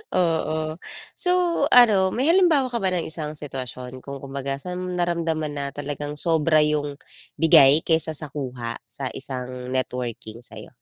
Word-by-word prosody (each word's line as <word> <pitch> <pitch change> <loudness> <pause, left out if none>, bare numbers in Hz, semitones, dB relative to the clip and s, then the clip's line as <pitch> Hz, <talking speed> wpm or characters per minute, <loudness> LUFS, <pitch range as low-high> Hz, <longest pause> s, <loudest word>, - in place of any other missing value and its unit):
Oo. 160 -2 0 0.3
So, 360 - +1 0.4
ano 210 -6 +6
may 275 +7 +3
halimbawa 320 -9 +3
ka 235 - -1
ba 190 - 0
ng 170 - -1
isang 155 -1 -5
sitwasyon 130 -3 -7
kung 140 +1 -9
kumbaga 135 0 -3
saan 180 +6 -6
mo 185 - -4
naramdaman 165 -3 -1
na 140 -1 -4
talagang 145 +1 -5
sobra 155 -1 +3
yung 145 -1 -1 0.4
bigay 155 -2 +6
kaysa 160 -1 +1
sa 145 -2 -6
kuha 125 -5 -5
sa 130 +4 -3
isang 125 -1 -5
networking 120 -3 -4
sa'yo? 110 -3 -11
150 Hz, 150 wpm, -23 LUFS, 130-165 Hz, 0.4 s, ano